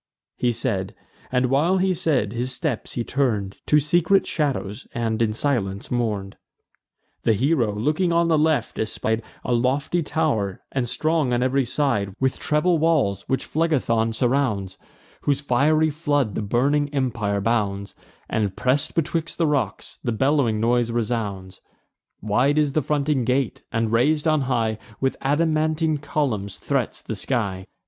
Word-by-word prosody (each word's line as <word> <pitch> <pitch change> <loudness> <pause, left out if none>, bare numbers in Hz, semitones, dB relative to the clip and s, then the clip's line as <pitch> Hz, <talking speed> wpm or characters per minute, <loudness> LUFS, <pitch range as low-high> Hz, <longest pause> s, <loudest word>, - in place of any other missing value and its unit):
He 120 - +1
said; 110 -5 -2 0.4
and, 125 0 +2
while 165 +8 +3
he 190 0 +2
said, 130 - 0
his 125 +2 -2
steps 140 -3 -3
he 120 - -2
turn'd 110 -8 -1
To 150 - +5
secret 175 +5 +3
shadows, 135 -7 -2
and 115 -1 -1
in 110 -2 +2
silence 110 -5 -2
mourn'd. 105 -5 -2 0.8
The 115 - +3
hero, 125 0 +2
looking 155 - +1
on 170 0 +3
the 165 - +3
left, 150 -6 +1
espied 110 +1 -1 0.2
A 125 - 0
lofty 135 +8 +1
tow'r, 140 - -1
and 125 -3 -1
strong 155 -4 +1
on 120 +1 +2
ev'ry 130 +1 +2
side 120 -8 0
With 130 0 0
treble 160 +3 +2
walls, 145 - +1
which 135 - 0
Phlegethon 130 -8 +1
surrounds, 120 -7 0 0.5
Whose 140 -2 +1
fiery 150 +4 +2
flood 145 - 0
the - - -2
burning 140 +7 +1
empire 120 -8 -1
bounds; 100 -2 -1 0.3
And, 105 -4 -1
press'd 130 +8 0
betwixt 165 0 -1
the 165 - +2
rocks, 135 -10 -2
the 120 - 0
bellowing 130 -2 +2
noise 120 +1 +2
resounds 105 -5 -3 0.6
Wide 125 +8 +2
is 150 -2 +3
the 155 - +1
fronting 145 -1 0
gate, 130 +1 0
and, 115 -1 0
rais'd 150 +7 +2
on 155 -2 +3
high 110 -3 0 0.2
With 135 0 0
adamantine 155 +1 +1
columns, 120 -10 -2
threats - - -2
the - - -4
sky. 100 -8 -2
130 Hz, 150 wpm, -23 LUFS, 110-150 Hz, 0.8 s, To